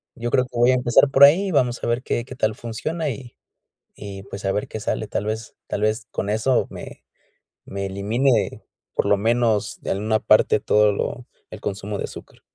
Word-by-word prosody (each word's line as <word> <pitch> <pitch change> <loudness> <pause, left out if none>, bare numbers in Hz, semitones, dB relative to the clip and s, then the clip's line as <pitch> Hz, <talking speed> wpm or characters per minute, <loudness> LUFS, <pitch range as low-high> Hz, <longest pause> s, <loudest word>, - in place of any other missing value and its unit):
Yo 120 0 -4
creo 130 - +3
que 125 - -9
voy 120 +2 +5
a - - +3
empezar 125 +2 +4
por 140 0 +6
ahí, 185 +7 +4
vamos 125 -6 +1
a - - -1
ver 120 +1 0
qué 120 - -1
qué 130 - -9
tal 110 -4 0
funciona, 150 +8 -3
y 125 -2 -7 0.6
y, 100 -1 -8
pues, 100 +1 -9
a 95 - +2
ver 105 - -2
qué 110 - -6
sale. 110 0 -2
Tal 105 - -3
vez, 110 +1 -4
tal 105 - -3
vez 110 +1 0
con 100 - -3
eso 110 +5 +1
me - - -10 0.6
me 100 0 -4
elimine, 110 +5 0 0.3
por - - +1
lo 100 - +5
menos, 110 -1 +1
de - - -3
a - - +1
una 110 +2 0
parte, 110 0 +4
todo 105 0 +3
lo 120 +4 -3 0.3
el 110 0 -9
consumo 100 +1 -4
de - - -2
azúcar. - - -12
110 Hz, 210 wpm, -22 LUFS, 105-125 Hz, 0.6 s, por